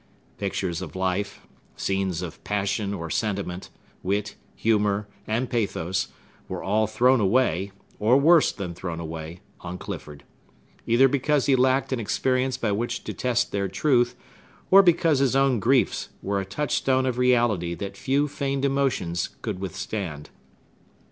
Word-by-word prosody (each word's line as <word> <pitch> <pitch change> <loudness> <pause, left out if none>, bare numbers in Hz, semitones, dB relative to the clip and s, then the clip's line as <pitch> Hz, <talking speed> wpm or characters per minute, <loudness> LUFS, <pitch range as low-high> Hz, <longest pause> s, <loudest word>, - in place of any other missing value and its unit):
Pictures 95 -3 -2
of 95 -2 -7
life, 95 +2 -2 0.3
scenes 95 -3 -1
of 85 - -8
passion 100 0 -1
or 85 -5 -5
sentiment, 100 -4 -2 0.3
wit, 100 +3 -1 0.2
humor, 105 -2 +1 0.2
and 115 +4 0
pathos, 95 -5 -1 0.4
were - - -4
all 110 +2 +2
thrown 125 +4 +3
away, 100 -2 +2 0.3
or 115 +5 +4
worse 160 +3 +5
than 90 -4 -5
thrown 85 -1 -5
away, 80 +1 -7 0.2
on 90 +1 -6
Clifford; 75 -4 -8 0.6
either 120 +4 +5
because 140 +1 +1
he 135 - +4
lacked 130 +1 +2
an 130 - -1
experience 130 +3 0
by 110 - -1
which 120 +4 -2
to - - -5
test 125 -1 0
their 100 -1 -1
truth, 120 +4 +2 0.6
or 195 +1 +10
because 165 -5 +3
his 135 -1 +2
own 135 -3 +3
griefs 125 +5 +2
were 100 0 0
a - - -5
touch 145 +10 -3
stone 130 -1 +2
of 125 -1 -1
reality 120 -9 +2
that 100 +1 -6
few 140 +2 +1
feigned 140 -1 -2
emotions 135 -11 0
could 105 -5 -3
withstand. 95 -5 -5
110 Hz, 150 wpm, -25 LUFS, 95-130 Hz, 0.6 s, or